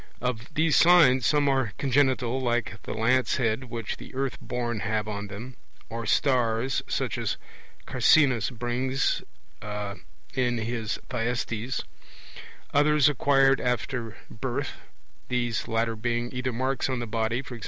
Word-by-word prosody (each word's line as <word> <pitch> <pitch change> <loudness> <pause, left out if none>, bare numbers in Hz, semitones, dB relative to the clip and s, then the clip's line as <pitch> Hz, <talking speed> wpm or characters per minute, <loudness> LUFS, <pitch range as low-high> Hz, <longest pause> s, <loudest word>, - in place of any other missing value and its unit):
Of 125 -1 -3
these 160 0 +3
signs 155 -9 +6
some 145 -1 +3
are 130 -6 +1
congenital, 130 -2 +2
like 120 -3 -1
the - - -4
'lance 125 +4 +2
head 115 +1 0
which 115 -3 -5
the - - -11
Earth 135 -1 -1
born 120 -2 -3
have 105 0 -1
on 105 -1 -4
them', 115 +6 -8 0.3
or 115 -1 -5
'stars', 125 -1 +2
such - - -1
as - - -1 0.5
Carcinus 130 -8 +4
brings 125 +2 -1 0.4
in 105 -1 -5 0.3
in 120 -2 +1
his 115 -1 -2
Thyestes; 120 0 -2 0.9
others 150 0 +5
acquired 135 -1 +3
after 125 -2 -2
birth - - -3 0.6
these 120 -2 -1
latter 115 0 0
being 120 +2 -2
either 125 0 -2
marks 130 +2 -1
on 130 - -1
the 120 - -3
body, 115 +1 -1
e.g. 125 -2 -6
120 Hz, 135 wpm, -27 LUFS, 115-130 Hz, 0.9 s, signs